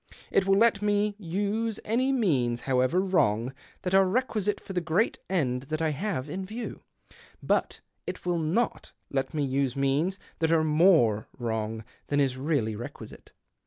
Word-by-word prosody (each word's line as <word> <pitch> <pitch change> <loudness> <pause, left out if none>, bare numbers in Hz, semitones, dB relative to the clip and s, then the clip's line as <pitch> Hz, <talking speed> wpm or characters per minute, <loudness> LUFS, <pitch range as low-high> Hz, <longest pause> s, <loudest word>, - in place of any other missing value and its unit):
It 195 - +2
will 195 0 +4
let 220 -2 +4
me 205 0 +1
use 205 +4 -2
any 250 +5 +1
means, 135 - +1
however 130 +6 +2
vrong, 125 - +1 0.3
that 180 - -2
are 195 0 +6
requisite 210 -2 0
for 195 - -9
the 180 - 0
great 170 +7 +1
end 130 -8 0
:hat 155 0 -1
I 160 -1 +1
have 150 -2 -2
in 185 +6 -4
view; 220 +5 -6 0.6
but - - 0 0.3
it - - -6
will 175 -1 +1
not 175 +10 -1 0.2
let 135 +2 -1
me 140 -2 0
ise 130 -1 -2
means 140 +7 +1 0.2
that 160 0 +2
are 160 -1 +4
more 155 - +4
wrongr 110 -1 -2 0.2
than 145 - +1
is 135 -3 +2
reallv 130 -6 -1
'equisite. - - -10
165 Hz, 160 wpm, -28 LUFS, 135-200 Hz, 0.6 s, are